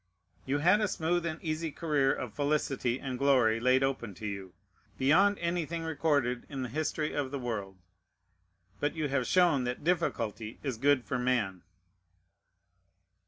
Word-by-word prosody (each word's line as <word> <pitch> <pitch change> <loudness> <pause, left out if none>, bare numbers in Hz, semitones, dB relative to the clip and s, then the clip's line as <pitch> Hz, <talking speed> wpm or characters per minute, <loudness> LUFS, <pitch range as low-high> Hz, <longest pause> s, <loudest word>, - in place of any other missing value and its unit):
You 135 +2 +1
had 180 +8 +4
a 210 - +2
smooth 170 0 0
and 160 -1 -4
easy 160 0 -2
career 145 -3 +1
of 120 -5 -4
felicity 140 -3 0
and 130 -2 -5
glory 125 -5 +4
laid 130 +2 +3
open 125 -7 -2
to 110 - -8
you, 100 -3 -6 0.4
beyond 190 +10 +4
anything 170 -1 -2
recorded 145 -6 0
in 135 -2 -4
the 125 - -4
history 155 +1 -2
of 145 -2 -1
the 140 - -4
world; 105 -7 -4 1.0
but 145 +2 -1
you 155 -2 -1
have 130 -2 0
shown 175 -8 +4
that 125 +3 -4
difficulty 115 - -1
is 135 -5 -2
good 140 -1 +3
for 125 - -2
man. 115 -8 0
140 Hz, 155 wpm, -30 LUFS, 125-160 Hz, 1.0 s, had